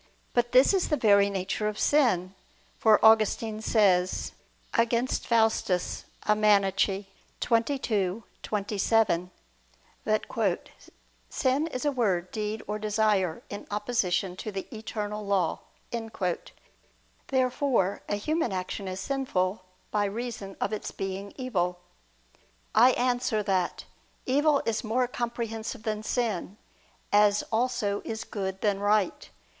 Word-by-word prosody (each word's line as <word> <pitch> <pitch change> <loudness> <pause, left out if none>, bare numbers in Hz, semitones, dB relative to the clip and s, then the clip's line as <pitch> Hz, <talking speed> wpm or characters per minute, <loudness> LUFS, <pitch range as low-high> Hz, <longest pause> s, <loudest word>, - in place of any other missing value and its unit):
But 240 -1 +1
this 255 +9 +6
is 380 -2 +1
the 300 - +2
very 200 -4 +5
nature 195 +2 -2
of 210 0 -3
sin; 195 -11 +2 0.5
for 220 -2 +5
Augustine 220 0 +4
says 190 -5 +2 0.4
(Contra 235 +1 +2
Faust. 225 -3 +1
xxii, 200 +1 +1 0.4
27) 210 -5 0 0.7
that 215 -3 0 0.7
"sin 270 +5 +1
is 255 -3 -4
a 290 - +3
word, 190 -9 0
deed, 215 0 -3
or 210 +1 -3
desire, 210 -5 +1
in 205 - -7
opposition 205 -4 0
to 215 - -5
the 195 -1 -4
Eternal 210 -1 -4
Law." 195 -5 0 1.7
Therefore 255 -6 +1
a 205 - +1
human 305 +4 -1
action 190 +1 -4
is 185 0 -4
sinful 195 -6 -1 0.3
by 205 -1 +1
reason 215 -2 -5
of 210 - -1
its 215 - -3
being 195 +1 -5
evil. 180 -9 -1 1.0
I 245 +3 +6
answer 245 -3 0
that, 190 -3 0 0.4
Evil 285 +2 +3
is 230 +1 -1
more 245 +3 +1
comprehensive 235 -1 -4
than 215 -2 -2
sin, 215 -4 -2 0.6
as 205 0 +5
also 225 -3 0
is 220 0 -4
good 190 -2 -4
than 205 -2 +1
right. 205 -2 +1
215 Hz, 115 wpm, -28 LUFS, 195-235 Hz, 1.7 s, this